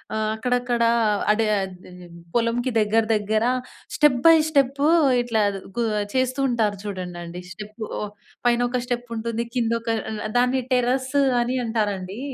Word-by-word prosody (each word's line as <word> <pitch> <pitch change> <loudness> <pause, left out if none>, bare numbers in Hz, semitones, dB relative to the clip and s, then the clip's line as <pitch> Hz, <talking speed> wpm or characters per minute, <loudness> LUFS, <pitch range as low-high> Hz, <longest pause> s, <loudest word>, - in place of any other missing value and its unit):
ఆహ్, 215 0 0
అక్కడక్కడ 245 +1 -1 0.5
అడే 220 0 0 0.2
అది 185 -1 -9 0.5
పొలంకి 240 +2 +1
దగ్గర, 220 +1 +2
దగ్గర 215 +1 0 0.5
స్టెప్ 295 -5 +4
బై 330 - +9 0.2
స్టెప్ 275 -1 +2 0.4
ఇట్లా 230 -2 0 0.4
గు 240 - +1 0.3
చేస్తూ 255 +1 0
ఉంటారు 220 -4 0
చూడండండి 180 -3 -6
స్టెప్ 210 +1 -10 0.2
ఓ - - -4 0.5
పైన 240 0 +3
ఒక 250 0 -1
స్టెప్ 245 -1 -3
ఉంటుంది 230 +1 -2
కిందొక 230 -1 -1 0.4
అ - - -6
దాన్ని 250 +1 +2
టెర్రస్ 255 +2 0 0.3
అని 250 +2 -1
అంటారండి. 205 -3 -2
230 Hz, 130 wpm, -23 LUFS, 215-250 Hz, 0.5 s, బై